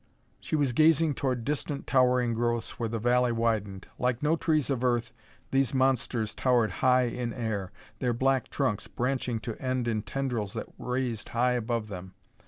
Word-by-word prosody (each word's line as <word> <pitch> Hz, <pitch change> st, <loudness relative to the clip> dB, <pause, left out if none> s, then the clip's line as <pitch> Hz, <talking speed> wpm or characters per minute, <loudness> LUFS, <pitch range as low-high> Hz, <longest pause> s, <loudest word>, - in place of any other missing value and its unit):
She -, -, -3 dB
was 140 Hz, -5 st, +1 dB
gazing 155 Hz, +2 st, +4 dB
toward 125 Hz, -4 st, -2 dB
distant 145 Hz, 0 st, -2 dB
towering 125 Hz, -2 st, +3 dB
growths 120 Hz, 0 st, -1 dB
where 115 Hz, -2 st, -1 dB
the 115 Hz, -, -2 dB
valley 120 Hz, +2 st, +2 dB
widened. 110 Hz, -4 st, -1 dB
Like 125 Hz, +1 st, 0 dB
no 155 Hz, +2 st, +3 dB
trees 155 Hz, -4 st, +1 dB
of 130 Hz, -2 st, -1 dB
Earth, 120 Hz, -2 st, +1 dB, 0.4 s
these 135 Hz, -1 st, +2 dB
monsters 130 Hz, -4 st, +1 dB
towered 120 Hz, -4 st, +2 dB
high 125 Hz, 0 st, +5 dB
in 120 Hz, 0 st, -2 dB
air, 110 Hz, -6 st, -3 dB, 0.3 s
their 125 Hz, -, +1 dB
black 130 Hz, +2 st, +1 dB
trunks 130 Hz, -8 st, -1 dB
branching 125 Hz, -2 st, -1 dB
to 115 Hz, -1 st, -4 dB
end 130 Hz, -2 st, -1 dB
in 110 Hz, -2 st, 0 dB
tendrils 115 Hz, -2 st, -3 dB
that -, -, -6 dB
raised 125 Hz, -4 st, -2 dB
high 125 Hz, +2 st, +2 dB
above 120 Hz, -2 st, -1 dB
them. 95 Hz, -2 st, -8 dB
125 Hz, 170 wpm, -28 LUFS, 115-130 Hz, 0.4 s, high